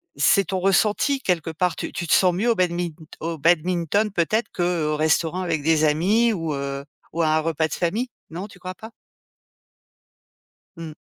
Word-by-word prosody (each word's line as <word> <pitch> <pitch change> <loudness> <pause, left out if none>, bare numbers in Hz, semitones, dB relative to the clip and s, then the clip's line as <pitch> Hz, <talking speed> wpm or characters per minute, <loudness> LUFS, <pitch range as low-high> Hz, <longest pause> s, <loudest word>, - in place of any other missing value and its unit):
c'est 200 -2 +3
ton 190 +2 -2
ressenti 210 +8 +2
quelque 170 - -1
part 170 +1 0
tu - - -5
tu 170 - -4
te - - +2
sens 180 -2 +4
mieux 215 +7 0
au 230 - +1
badmin 175 -1 0 0.3
au 165 0 -4
badminton 175 +5 +2
peut-être 200 +6 0
qu'au 175 -4 0
restaurant 160 +3 +1
avec 165 -5 -1
des 160 0 +3
amis 205 +10 +3
ou, 165 -5 -3
heu, 140 0 -4 0.3
ou 165 - -1
à 160 - +2
un 155 - +3
repas 160 0 0
de - - -7
famille, 215 +9 -1 0.2
non 180 +5 -6
tu 200 - -16
crois 185 0 -7
pas? 220 +3 -10 1.9
Mmh. 165 -2 -7
175 Hz, 180 wpm, -23 LUFS, 160-190 Hz, 1.9 s, sens